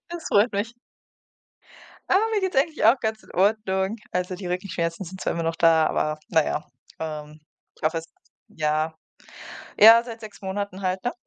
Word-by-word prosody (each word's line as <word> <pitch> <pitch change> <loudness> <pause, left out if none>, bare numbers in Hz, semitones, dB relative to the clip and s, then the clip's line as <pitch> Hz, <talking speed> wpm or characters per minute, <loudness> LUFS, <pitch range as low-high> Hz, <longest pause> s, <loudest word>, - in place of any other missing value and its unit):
das 345 -1 -7
freut 210 +4 +3
mich. 205 +4 -2 1.4
Ah, 380 - +5
mir 420 - +1
geht's 375 -1 -2
eigentlich 310 +3 +1
auch 230 +5 +6
ganz 220 -1 -3
in - - -16
Ordnung. 195 +1 +1
Also 180 0 -2
die 185 0 -7
Rückenschmerzen 180 -1 -3
sind 185 +2 -9
zwar - - -1
immer 170 - -2
noch 165 0 -1
da, 165 -1 +4
aber 155 0 -1
na 160 -2 +4
ja. 150 - -3 0.3
Ähm, 155 -1 -6 0.4
ich - - -24
hoffe 160 +2 +1
es 165 - -11 0.4
ja, 155 0 -1 0.9
ja 225 +2 +9
seit 235 -1 -9
6 215 -2 -11
Monaten 195 0 -4
halt, 185 0 -1
ne? 245 - 0
190 Hz, 175 wpm, -24 LUFS, 165-220 Hz, 1.4 s, ja